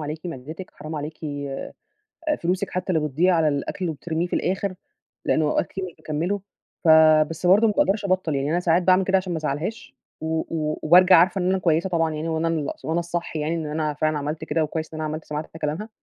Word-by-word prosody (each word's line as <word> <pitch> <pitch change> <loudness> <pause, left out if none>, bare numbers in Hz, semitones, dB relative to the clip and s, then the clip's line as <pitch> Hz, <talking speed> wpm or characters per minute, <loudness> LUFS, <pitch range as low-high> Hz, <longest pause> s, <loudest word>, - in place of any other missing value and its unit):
عليكِ 155 +3 -5
معدتِك، 160 +4 -7
حرام 155 +2 -7
عليكِ 150 +2 -5 0.3
آآ 135 - -6 0.7
فلوسِك 180 +2 0
حتّى 185 0 -2
اللي 155 -2 +1
بتضيّع 175 +7 +2
على 160 -2 +3
الأكل 145 +6 -2
اللي 165 -3 -1
بترميه 165 +3 -2
في - - -16
الآخِر،" 190 0 -1 0.5
لإن 160 - +2
هو 150 - +2
أوقات - - +1
كتير 190 - -5
مش 180 -3 -8
باكمِّله. 170 +7 -2 0.4
ف - - +2 0.4
بس 165 +2 -4
برضه 200 +5 +6
ما 215 - +2
باقدرش 200 +1 +2
أبطّل، 185 -5 0
يعني 140 +1 -1
أنا 175 +2 +1
ساعات 175 0 +3
باعمل 185 +1 +4
كده 190 +1 +3
عشان 185 -1 -1
ما 165 - -1
أزعّلهاش 155 +8 -4 0.3
و 160 - -4
و 155 -2 -3
وبارجع 180 +3 +7
عارفة 180 +3 +4
إن 180 - +1
أنا 190 - +2
كويسة 170 0 +1
طبعًا 165 -2 +1
يعني 155 +2 -3
وإن 160 0 -1
أنا 165 -1 0
الص - - -24
وأنا 165 +2 0
الصح 170 -1 -4
يعني 155 +2 -1
إن 160 -2 -3
أنا 150 0 -2
فعلًا 155 0 0
عملت 150 +2 -4
كده 160 +1 0
وكويس 160 +1 -5
إن 155 - -5
أنا 155 - -2
عملت 155 +1 -5
سمعت 150 +1 -4
حتّى 160 - -13
كلامها. 160 +8 -3
165 Hz, 230 wpm, -24 LUFS, 155-180 Hz, 0.7 s, وبارجع